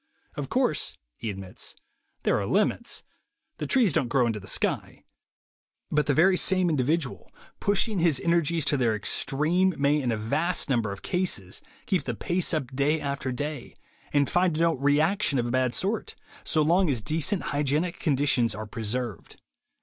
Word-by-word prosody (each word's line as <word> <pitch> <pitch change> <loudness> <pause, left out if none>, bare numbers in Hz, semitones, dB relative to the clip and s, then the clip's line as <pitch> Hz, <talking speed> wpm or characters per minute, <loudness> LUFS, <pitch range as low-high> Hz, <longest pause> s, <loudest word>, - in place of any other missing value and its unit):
"Of - - -5
course," - - 0 0.2
he 115 - -5
admits, 95 -2 -7 0.5
"there - - +2
are 100 - -3
limits: 210 +4 0 0.6
the - - -3
trees 240 - +3
don't 130 - +1
grow 125 0 +3
into 115 -2 -1
the 95 - -12
sky.... - - -1 0.9
But 150 0 +1
the 145 - +2
very 185 +4 +5
same 185 -2 +3
individual, 150 0 -1 0.3
pushing 205 0 +1
his 165 -6 +3
energies 170 -2 +1
to 145 - +2
their 120 -4 +2
extreme, 155 - +1
may 145 +1 +2
in 125 -3 0
a 110 - -1
vast 155 +9 -1
number 115 -5 +1
of 100 - -8
cases 175 - -1 0.2
keep - - 0
the - - -3
pace 175 0 0
up 135 -5 -3
day 145 +3 +2
after 140 -2 -3
day, 145 0 -5 0.4
and 145 -1 +2
find 175 -3 +1
no 165 0 +3
'reaction' 150 +4 +2
of 120 - 0
a 120 - -2
bad 130 -1 +1
sort, 205 +3 -1 0.3
so 155 - +1
long 175 +3 +3
as 125 -6 0
decent 165 - 0
hygienic 150 +4 0
conditions 135 -6 +2
are 110 +1 -5
preserved." 110 -1 -4
145 Hz, 165 wpm, -26 LUFS, 125-170 Hz, 0.9 s, very